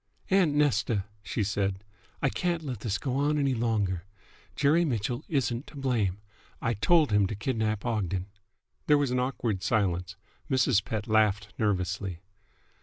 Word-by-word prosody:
"Aunt 180 -6 +4
Nesta," 120 -8 +2 0.2
she 100 +4 -2
said, 100 -1 -1 0.4
"I 135 - +4
can't 170 +2 -1
let 130 -7 -4
this 105 -1 -1
go 130 -2 -2
on 145 +2 +2
any 140 -2 +2
longer. 110 -7 0 0.5
Jerry 150 +4 +4
Mitchell 120 -2 -1
isn't 130 -4 0
to - - -13
blame. 115 -9 0 0.4
I 115 - 0
told 155 - +3
him 105 -2 +4
to 105 - -4
kidnap 110 -1 -1
Ogden!" 95 -6 -1 0.6
There 150 - +6
was 140 -3 +1
an 125 - +1
awkward 120 -6 -1
silence. 95 -5 0 0.3
Mrs. 130 -6 +3
Pett 105 +3 -4
laughed 105 -2 +2
nervously. 95 -3 -1
110 Hz, 150 wpm, -28 LUFS, 100-135 Hz, 0.6 s, There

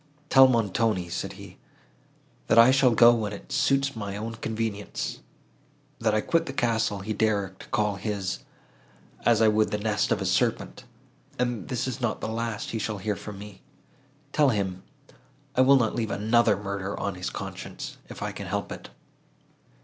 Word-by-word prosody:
"Tell 135 0 +8
Montoni," 110 -5 +1
said - - -4
he, - - -12 0.9
"that - - +3
I 115 +2 +9
shall 135 -1 +5
go 120 +1 +8
when 110 -3 -2
it 100 - -10
suits 135 -1 +1
my 100 -2 -5
own 115 +2 -4
convenience; 110 -2 -4 0.8
that 110 -2 +1
I 110 - +2
quit 165 +6 +1
the 135 - -4
castle, 115 -5 0
he 110 +3 -3
dares 105 -3 +1
to - - -11
call 105 -1 0
his, 100 -2 -3 0.9
as 115 -2 +5
I - - +6
would 110 0 +3
the 105 - -1
nest 105 0 0
of - - +2
a - - -3
serpent, - - 0 0.5
and 120 0 0
that 100 - -9
this 125 0 -2
is 130 0 -4
not 120 -3 -1
the - - -4
last 115 -1 -3
he 115 - -2
shall 110 0 -3
hear 105 +2 -2
from 105 0 -8
me. 100 -1 -11 0.7
Tell 150 -2 +4
him, 95 -5 -1 0.7
I 130 - +4
will 135 +1 +7
not 115 -4 +1
leave 115 -2 -2
another 110 +1 +3
murder 100 -1 -4
on 100 - -2
his 90 +1 -4
conscience, - - -7
if - - -7
I - - -2
can - - -7
help - - -3
it." - - -8
110 Hz, 180 wpm, -26 LUFS, 100-120 Hz, 0.9 s, I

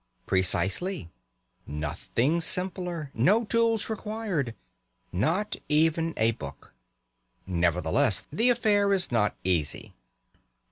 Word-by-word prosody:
Precisely. 95 - 0 0.6
Nothing 115 - -1
simpler! 180 -4 -1
No 205 - +3
tools 230 0 +1
required! 210 - -3 0.6
Not 165 - 0
even 160 +2 +2
a 110 +1 +3
book. 70 -10 -10 0.7
Nevertheless, 90 - +1
the 235 +3 +3
affair 210 -4 +3
is 185 -7 +2
not 110 -3 +1
easy. 85 -6 -1
160 Hz, 90 wpm, -27 LUFS, -, 0.7 s, No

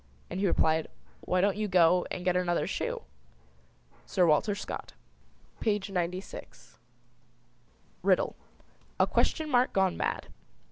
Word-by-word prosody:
And 180 - -3
he 200 - +2
replied, 160 -2 +2 0.3
"Why 180 0 0
don't 200 0 +2
you 215 0 -1
go 180 -1 +4
And 180 - -5
get 180 -1 +2
another 175 -1 +1
shoe?" - - -3 1.0
Sir 180 - +3
Walter 170 +6 +3
Scott, 205 - -6 0.7
page 205 -3 0
96. 180 +1 -5 1.2
RIDDLE. 185 0 +2 0.6
A - - +6
question 315 -2 +1
mark 250 -3 +2
gone 190 -2 +2
mad. - - -2
185 Hz, 125 wpm, -29 LUFS, 175-200 Hz, 1.2 s, A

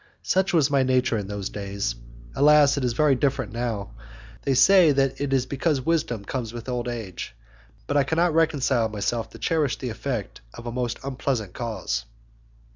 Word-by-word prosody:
Such 190 +1 +1
was 155 -5 +3
my 140 -1 +3
nature 130 -1 +2
in 105 -3 -3
those 100 -1 -4
days; 100 -10 -3 0.4
alas; 150 0 +5
it 140 - -2
is 125 -2 +1
very 150 +3 +3
different 130 -4 0
now. 115 - -3 0.5
They 135 - 0
say 180 +3 +6
that 135 -1 0
it 140 -1 -1
is 130 -2 +2
because 140 +2 0
wisdom 130 -8 -1
comes 120 -2 -4
with 120 0 -8
old 125 -1 -2
age, 115 - -6 0.5
but 145 - -3
I 140 - +5
cannot 165 +4 +1
reconcile 140 -7 +2
myself 110 +2 -2
to - - -12
cherish 150 -7 0
the 130 - -4
effect 115 -2 -4
of 120 - -10
a 120 - -3
most 120 -1 -2
unpleasant 130 -7 -2
cause. 110 - -3
130 Hz, 180 wpm, -25 LUFS, 115-140 Hz, 0.5 s, say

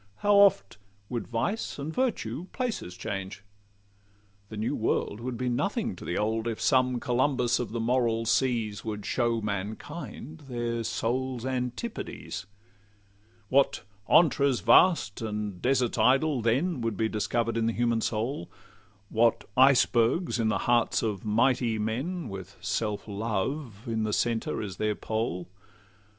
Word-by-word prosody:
How 205 - +5
oft 170 - +4 0.3
would 120 -4 -3
vice 120 - -2
and 145 +3 -5
virtue 185 - -1
places 225 - -3
change! 95 0 -5 1.1
The 110 - -7
new 110 +7 -1
world 110 -1 -1
would 120 0 -4
be 125 - -2
nothing 190 - -1
to - - -11
the 85 - -2
old, 110 +2 0
If 115 -2 -3
some 130 -2 +2
Columbus 125 0 +1
of 125 - -3
the 115 - -3
moral 115 -1 +1
seas 115 -4 0
Would 105 -2 -5
show 120 -2 0
mankind 110 - -6
their 120 -1 -2
souls' 120 +3 -2
antipodes. 125 - -4 1.0
What 140 +1 +3 0.3
'antres 140 -6 +4
vast 160 - +4
and 105 -4 -4
deserts 125 -3 +1
idle' 135 +4 +3
then 130 +7 +1
Would 115 -3 -2
be 110 - +1
discover'd 115 +2 -1
in 115 -1 +1
the - - +2
human 115 -1 +1
soul! 110 -2 -2 0.6
What 115 +1 +2
icebergs 130 +3 +4
in 115 - +2
the 105 -3 +1
hearts 120 -1 +2
of 105 -4 -2
mighty 115 +1 +2
men, 130 +10 -2
With 95 -1 -8
self 105 0 -2
love 110 +3 -3
in 115 -2 -1
the 110 -1 -1
centre 115 -1 0
as 95 -3 -6
their 105 -1 0
pole! 110 -6 -3
115 Hz, 140 wpm, -28 LUFS, 110-130 Hz, 1.1 s, How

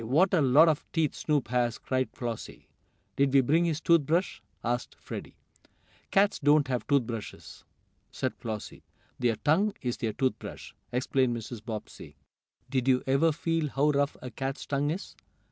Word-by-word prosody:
What 155 +12 +3
a 175 - +4
lot 140 +5 +6
of 155 -3 +1
teeth 160 -4 +1
Snoop 145 -7 -1
has!" 120 -1 +1
cried 130 -1 -1
Flossie. 120 -3 -6 0.5
"Did 140 -1 +3
we 135 0 +6
bring 160 +7 +3
his 160 -3 0
tooth 170 -1 +5
brush?" 175 +4 0 0.2
asked 120 +1 -2
Freddie. - - -8 0.7
"Cats 200 +1 +3
don't 145 0 +4
have 125 -2 -2
tooth 140 -3 +3
brushes!" 115 -2 -8 0.5
said - - -2
Flossie. 110 -2 -6 0.4
"Their 120 -3 +2
tongue 160 - +2
is 120 -1 -1
their 110 -2 -2
tooth 130 +3 0
brush," - - -9 0.2
explained 125 -1 +1
Mrs. 115 -1 -7
Bobbsey. 110 -1 -7 0.5
"Did 130 -1 -1
you 130 -1 +3
ever 140 +5 +3
feel 165 0 -1
how 145 +3 +2
rough 140 0 0
a 125 - -6
cat's 135 +2 -4
tongue 145 +1 0
is?" 175 +6 -5
135 Hz, 165 wpm, -29 LUFS, 120-155 Hz, 0.7 s, lot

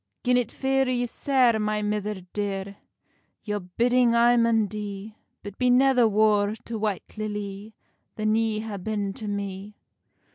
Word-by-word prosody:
"Gin 250 0 +3
it 245 -3 +1
fear 270 -1 0
you 245 -1 0
sair, 250 -2 +2
my 210 0 -1
mither 210 -1 -2
dear, 200 -1 -3 0.7
Your 210 -1 -2
bidding 235 +6 +2
I 240 +1 +5
maun 230 -2 +3
dee; 205 +1 -7 0.3
But 205 -1 -9
be 250 -1 +3
never 250 -1 +5
war 210 -1 +2
to 230 -2 -5
White 210 0 -3
Lilly 210 0 -5 0.4
Than 215 0 0
ye 220 -1 0
ha 215 -2 -5
been 200 0 -3
to 215 +1 -7
me." 200 0 -5
215 Hz, 150 wpm, -25 LUFS, 205-235 Hz, 0.7 s, I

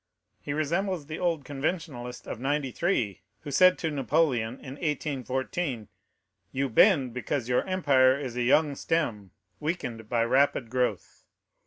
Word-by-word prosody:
He - - -5
resembles 165 +3 -1
the 155 +2 -6
old 165 -6 0
Conventionalist 140 -4 -4
of - - -6
'93, 135 - -1 0.2
who 145 - -7
said 185 +5 +6
to 160 - -2
Napoleon, 135 -5 +1
in 130 0 -9
1814, 130 - -2 0.6
'You 135 +1 -1
bend 135 - +4
because 125 0 -2
your 125 0 +2
empire 140 -8 +4
is 130 -4 -5
a 125 - -1
young 145 +4 +3
stem, 120 - -1 0.3
weakened 120 -9 -4
by 115 -1 +2
rapid 130 -2 +2
growth. 125 -1 -2
140 Hz, 135 wpm, -28 LUFS, 125-160 Hz, 0.6 s, said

